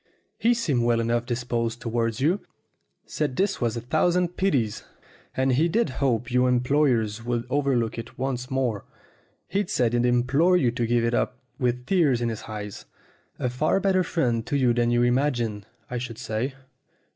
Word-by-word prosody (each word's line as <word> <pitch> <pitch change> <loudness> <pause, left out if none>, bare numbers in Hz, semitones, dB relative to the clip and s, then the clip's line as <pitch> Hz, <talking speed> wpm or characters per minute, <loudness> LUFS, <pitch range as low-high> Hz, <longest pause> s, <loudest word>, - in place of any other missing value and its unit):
"He 235 +1 +3
seemed 150 - 0
well 120 0 +2
enough 120 +1 0
disposed 120 -1 -2
towards 115 -1 -1
you; 170 +8 +2 0.7
said 145 -4 -3
it 195 -5 +1
was 120 -1 0
a - - -3
thousand 175 +7 +1
pities, 135 - 0 0.5
and 130 0 +2
he 155 +7 +3
did 230 0 +1
hope 120 -3 +1
your 125 +1 +3
employers 125 -4 +1
would 120 0 -2
overlook 130 -5 0
it 115 0 -9
once 130 -1 -3
more; 130 -6 -1 0.8
said 120 -7 +1
he'd 120 0 +2
implored 135 +9 +3
you 125 -6 +2
to 120 -1 -1
give 120 0 +2
it 115 - 0
up 125 - 0 0.2
with 125 -1 0
tears 150 -8 +3
in 120 -1 0
his 110 - -5
eyes. 105 -2 -7 0.5
A - - -1
far 140 +9 +1
better 190 -1 +2
friend 125 -10 0
to 145 - 0
you 125 -3 +3
than 120 0 +1
you 120 0 +3
imagine, 120 -5 0 0.2
I 125 - -3
should 120 -2 -6
say." 120 +5 -3
125 Hz, 170 wpm, -25 LUFS, 115-140 Hz, 0.8 s, He